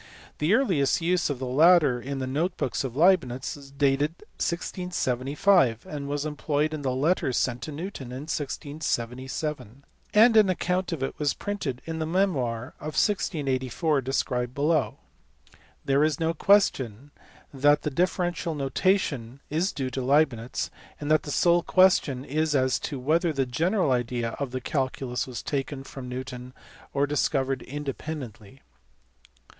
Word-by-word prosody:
The 160 +8 +3
earliest 180 - +2
use 175 0 +1
of 145 - -2
the 130 - -4
latter 145 -1 +5
in 140 +2 -4
the 130 - -2
note 155 +8 -1
books 130 - -1
of 130 -3 -5
Leibnitz 150 -6 +2
is 140 -2 -13
dated 140 +3 +1 0.2
1675, 150 - +1
it 150 -1 -5
was 145 +1 -2
employed 150 0 -1
in 155 - -4
the 135 - -1
letter 135 +3 +1
sent 125 0 0
to 155 - -5
Newton 155 -3 -6
in 125 +2 -6
1677, 140 -3 -4 0.3
and 225 +2 +6
an 215 -3 +6
account 180 0 0
of 155 -5 -3
it 135 - -4
was 150 -1 +1
printed 160 -12 -4
in 160 0 -4
the 160 - -2
memoir 135 -10 0
of 155 0 -6
1684 145 - 0
described 125 -1 -1
below. 145 -5 +1 0.9
There 140 +1 +3
is 155 -3 +1
no 165 0 +1
question 145 - +2 0.4
that 145 +2 +3
the 150 - -1
differential 175 +1 0
notation 140 - 0
is 170 +6 +1
due 130 -2 -3
to 130 - -3
Leibnitz, 130 -3 +1 0.3
and 145 0 -3
the 155 -1 +2
sole 175 +4 +3
question 170 -9 +3
is 155 +1 0
as 130 -1 +2
to 140 - -4
whether 165 +6 +2
the 135 -3 0
general 165 - +1
idea 120 -1 0
of 140 -2 -2
the 130 +1 -4
calculus 130 -2 -2
was 125 -2 -6
taken 135 -1 -3
from 135 -2 -8
Newton 125 0 -7 0.4
or 140 0 +1
discovered 135 -2 0
independently. 135 -5 -7
145 Hz, 150 wpm, -26 LUFS, 130-160 Hz, 0.9 s, and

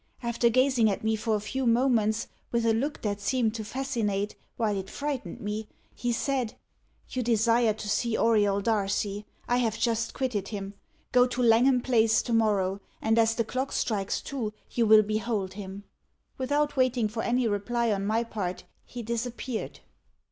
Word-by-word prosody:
After 235 0 +2
gazing 255 -2 +3
at 200 - -2
me 220 0 +2
for 220 0 0
a - - 0
few 255 +5 -2
moments, 230 -2 +2 0.2
with 235 -1 +1
a 225 - +4
look 280 +7 -2
that 205 -1 -2
seemed 235 -2 +1
to 225 -1 -4
fascinate 215 -5 -2 0.2
while 215 -3 +1
it 195 -1 -4
frightened 275 - -4
me, 210 +1 -3 0.3
he 245 - -2
said 250 -1 -1 0.5
'You 255 - -2
desire 230 -1 +3
to 215 - -7
see 220 +2 0
Auriol 205 -3 +3
Darcy. 205 -1 -1 0.2
I 245 - +2
have 225 -3 0
just 230 0 0
quitted 250 -7 -1
him. 200 -2 -5 0.4
Go 250 0 +5
to 250 0 -2
Langham 245 +3 +5
Place 225 -3 +3
to 240 - -2
morrow, 200 -4 +2 0.2
and, 225 +1 +2
as 225 0 +3
the 230 - +1
clock 260 +4 -2
strikes 200 -4 -1
two, 235 -6 -4 0.2
you 235 -2 +1
will 215 0 +8
behold 215 -2 -2
him.' 195 0 -8 0.5
Without 290 +3 0
waiting 255 -4 +2
for 220 +2 -4
any 245 +1 +1
reply 225 +3 0
on 195 -1 0
my 220 +3 +1
part, 195 -6 -4 0.2
he 245 -1 -8
disappeared." 235 +1 -4
225 Hz, 170 wpm, -28 LUFS, 210-245 Hz, 0.5 s, will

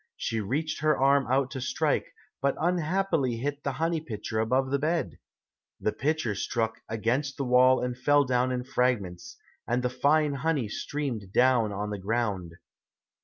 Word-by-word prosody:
She 115 -1 -2
reached 145 +10 -2
her 155 0 +3
arm 135 -1 +3
out 135 +1 +1
to 130 - -5
strike, 130 - -1 0.3
but 140 0 +1
unhappily 170 -6 +1
hit 145 +4 -3
the 140 - -1
honey 165 +1 -1
pitcher 110 -5 -4
above 130 +4 +1
the 140 - +1
bed. 155 - -1 0.6
The 105 - 0
pitcher 145 -4 -1
struck 110 +2 -2
against 120 +6 -1
the 140 - -2
wall 130 +1 +5
and 125 0 -2
fell 145 +3 +3
down 125 0 +1
in 125 -1 -2
fragments, 105 -10 -1 0.3
and 125 +1 0
the 125 - 0
fine 145 +3 +2
honey 140 -5 -1
streamed 120 -6 -4
down 125 -4 +4
on 105 +1 -3
the 105 - -4
ground. 100 -4 -2
130 Hz, 165 wpm, -28 LUFS, 115-145 Hz, 0.6 s, wall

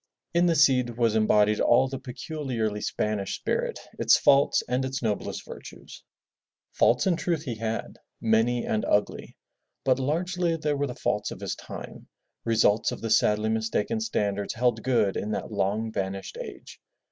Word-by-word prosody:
In 170 +1 +3
the 170 - +3
Cid 125 -6 +3
was 115 -3 +2
embodied 105 -1 +3
all 130 +3 +4
the 135 0 -5
peculiarly 125 -5 -4
Spanish 105 -2 -2
spirit, - - -2 0.2
its - - +5
faults 140 0 +4
and 125 +1 0
its 130 -1 -3
noblest 105 -3 -2
virtues. - - -11 0.7
Faults - - +3
in 185 -3 +3
truth 170 -4 -1
he 130 -6 -3
had 110 0 -4
— - - -55 0.2
many 120 +1 0
and 110 - -1
ugly, 105 0 -1 0.5
but 130 0 +2
largely 170 +5 0
they 150 -2 -1
were 145 0 -1
the 125 - -6
faults 105 0 -1
of - - -8
his - - -3
time, - - -9 0.4
results 110 -2 +3
of - - -6
the 115 - -3
sadly 105 0 +3
mistaken 110 - -1
standards 100 - -2
held 120 -1 +1
good 115 -6 +1
in 105 - -3
that - - -4
long 105 +2 -1
vanished 95 -1 -4
age. - - -10
120 Hz, 165 wpm, -26 LUFS, 105-135 Hz, 0.7 s, its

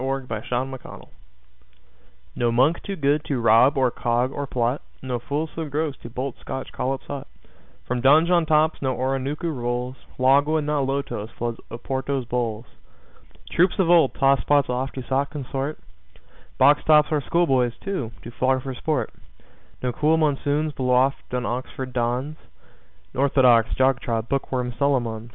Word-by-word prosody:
INCONTROVERTIBLE 130 0 -3
FACTS - - -12 1.2
NO 120 -1 +1
monk 130 +8 +3
too 200 - -5
good 145 -1 +1
to 140 - -1
rob, 115 +4 +5
or 130 -2 +3
cog, 120 +3 0
or 145 0 -4
plot, 125 +1 -1 0.2
No 125 -2 -2
fool 145 +6 -2
so 160 - -3
gross 150 0 -2
to 120 - -8
bolt 130 +2 -4
Scotch 130 - -5
collops 135 +1 -3
hot 140 -2 -6 0.6
From 125 0 -1
Donjon 160 +5 +4
tops 155 0 +3
no 130 -2 0
Oronooko 135 +5 -2
rolls. 125 +1 -3 0.2
Logwood, 145 +4 +3
not 145 -2 0
lotos, 135 -6 -3
floods 120 -1 -3
Oporto's 130 +2 -3
bowls. 120 -2 -2 0.9
Troops 180 +2 +3
of 180 -4 +3
old 165 -6 +5
tosspots 135 +1 +3
oft 130 +2 -3
to 130 - -5
sot 140 +1 0
consort. 140 0 -4 0.8
Box 145 +1 +5
tops 150 -1 +5
our 150 -2 +1
schoolboys, 130 -9 +2
too, 190 - -2
do 120 - -8
flog 130 0 +2
for 135 - -4
sport. 150 +2 -2 0.7
No 125 - 0
cool 155 +5 +2
monsoons 150 0 0
blow 125 -2 +1
oft 135 +2 +1
on 125 -1 -2
Oxford 130 +1 -4
dons. 125 +5 -1 0.8
Orthodox, 130 -4 +4
jog 130 0 +3
trot, 115 -3 -2
book 135 +2 -2
worm 125 -2 -1
Solomons! 120 -5 0
135 Hz, 150 wpm, -23 LUFS, 125-145 Hz, 1.2 s, rob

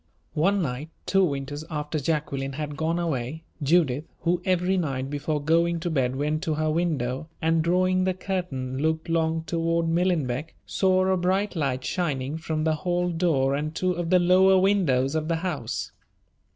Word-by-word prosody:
One 195 +5 +2
night, 135 +2 -4 0.2
two 195 0 +3
winters 145 -2 -2
after 150 -1 -3
Jacqueline 140 -2 -2
had 150 +1 -4
gone 160 +3 0
away, 160 -2 -2 0.2
Judith, 150 -2 +2 0.2
who 175 +1 +1
every 185 0 +2
night 135 -6 -2
before 150 +1 -1
going 165 +3 +2
to 175 0 -2
bed 130 -4 +1
went 150 +3 -1
to 160 -4 -1
her 155 0 0
window, 155 -4 -1
and, 165 0 +2
drawing 185 +2 +2
the 185 -1 0
curtain, 150 -10 -3
looked 160 +2 -1
long 160 -1 +1
toward 165 0 0
Millenbeck, 165 -5 0
saw 185 -1 +2
a 190 0 +2
bright 190 +3 0
light 135 -5 -1
shining 150 -4 -2
from 160 -1 -2
the 155 -1 +1
hall 180 +1 0
door 160 -6 +1
and 150 +3 -2
two 185 +1 +1
of 175 -1 -3
the 185 - +6
lower 185 +2 +5
windows 170 -9 +2
of 155 -1 -1
the 165 - +1
house. 140 -10 -3
160 Hz, 170 wpm, -26 LUFS, 145-175 Hz, 0.2 s, the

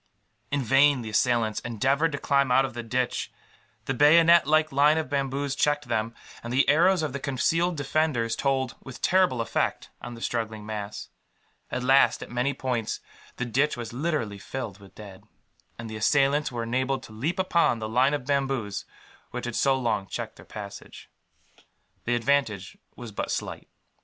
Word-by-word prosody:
In 140 -1 -1
vain 135 +1 +4
the 110 - -6
assailants 115 -1 +1
endeavoured 135 +8 0
to - - -1
climb 140 -2 +1
out 135 +2 +5
of 135 - -6
the 120 - -5
ditch. 120 +2 -2 0.5
The 135 - -1
bayonet 165 +4 +6
like 155 0 +3
line 145 +3 +4
of 155 -4 -3
bamboos 140 0 -1
checked 145 -2 0
them; 115 0 -1 0.3
and 120 - -6
the 130 +3 +3
arrows 170 +4 +4
of 150 -4 -2
the 140 - -3
concealed 165 +6 0
defenders 140 -5 0
told, 130 -1 0
with 130 -1 -10
terrible 180 -10 +3
effect, 115 - -2
on 120 0 -7
the 115 - -12
struggling 110 -3 -3
mass. 105 -1 -6 0.6
At 125 - -3
last, 135 +2 +4
at - - -12
many 125 +3 0
points, 120 -5 -2 0.4
the 125 - -3
ditch 135 +4 +1
was 120 -1 -6
literally 125 -8 -2
filled 110 -3 -6
with 100 -1 -16
dead; 100 -2 -11 0.5
and 115 - -7
the 110 0 -6
assailants 140 +6 +2
were 120 -1 -3
enabled 130 +3 -1
to - - -12
leap 135 +11 -2
upon 170 -8 +2
the 110 -1 -4
line 130 +6 +3
of 135 -4 -6
bamboos 135 -7 -1 0.4
which - - -5
had - - -4
so 135 -1 +3
long 110 -6 -1
checked - - -5
their - - -14
passage. - - -10 0.9
The 120 - +1
advantage 120 -5 0 0.2
was 120 -2 -9
but 100 - -4
slight. - - -4
130 Hz, 175 wpm, -26 LUFS, 115-145 Hz, 0.9 s, bayonet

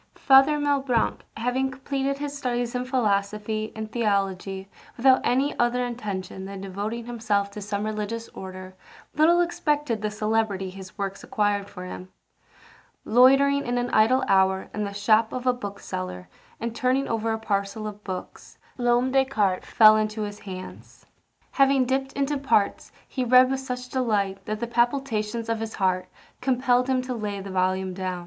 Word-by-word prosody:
Father 270 +2 +6
Malebranche 275 -5 +1 0.2
having 250 +3 0
completed 270 +1 -2
his 290 0 -4
studies 245 -3 -2
in 250 0 -2
philosophy 215 -3 -1
and 220 0 -6
theology 195 -4 -1 0.3
without 260 +2 +5
any 270 +4 +1
other 245 +1 +2
intention 200 -6 -5
than 195 0 -7
devoting 205 +5 -4
himself 215 -4 -1
to 210 - -8
some 205 +1 -3
religious 215 +2 -3
order, 185 0 -9 0.4
little 335 +3 +4
expected 295 -9 0
the 215 - -1
celebrity 215 -3 -1
his 190 0 -11
works 195 -1 -4
acquired 205 -5 0
for 180 - -8
him. 185 0 -8 1.0
Loitering 270 +4 +5
in 245 0 -1
an 245 0 -1
idle 225 +5 +4
hour 190 0 +2
in 210 0 -2
the 200 - -4
shop 215 +2 +2
of 255 0 -5
a 250 - +4
bookseller, 90 - -6 0.3
and 230 0 -4
turning 260 +3 +1
over 225 0 -1
a 220 - 0
parcel 205 0 -2
of 210 -1 -7
books, 185 -2 -7 0.2
L'Homme 245 +1 +2
de 270 0 +4
Descartes 205 -8 0
fell 215 -1 +7
into 215 0 -1
his 205 0 -6
hands. 185 -2 -10 0.5
Having 275 -1 +4
dipt 270 +1 -1
into 280 +1 -1
parts, 240 -7 +1 0.2
he 260 - -2
read 255 +1 +6
with 270 - 0
such 250 -1 -5
delight 210 -7 -1
that 215 0 -2
the 235 - -1
palpitations 235 -2 0
of 230 -1 -1
his 225 0 -5
heart 185 -2 0 0.3
compelled 250 -1 +2
him 260 -1 +1
to 255 0 -4
lay 210 -3 -4
the 195 0 -7
volume 185 0 0
down. 185 -1 -3
225 Hz, 165 wpm, -25 LUFS, 200-255 Hz, 1.0 s, fell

